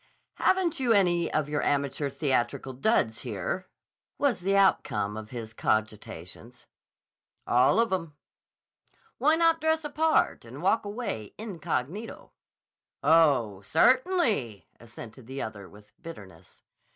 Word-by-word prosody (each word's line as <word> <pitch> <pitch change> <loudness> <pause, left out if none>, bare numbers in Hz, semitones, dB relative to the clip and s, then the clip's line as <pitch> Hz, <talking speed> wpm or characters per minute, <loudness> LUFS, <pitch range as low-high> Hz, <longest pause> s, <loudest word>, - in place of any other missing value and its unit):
"Haven't 365 -5 +1
you 245 -3 +3
any 175 -4 +2
of 155 -2 0
your 150 0 -1
amateur 140 0 0
theatrical 135 -2 -1
duds 125 - +1
here?" 120 - -4 0.5
was 280 -7 +1
the 195 +2 +1
outcome 105 - +2
of 110 0 -8
his 115 -2 -7
cogitations. 110 0 -3 0.8
"All 125 - +4
of 230 -4 +2
'em." 165 -5 -3 1.0
"Why 305 +6 +4
not 330 0 +3
dress 320 0 +1
a 295 - -5
part 315 +1 +2
and - - -10
walk - - +2
away 205 - -5
incognito?" 195 - -5 0.7
"Oh, 140 -12 +3
certainly!" 230 - +2
assented 115 +1 -12
the 135 +1 -5
other 100 -3 -8
with 105 +1 -18
bitterness. 100 - -12
145 Hz, 120 wpm, -27 LUFS, -, 1.0 s, All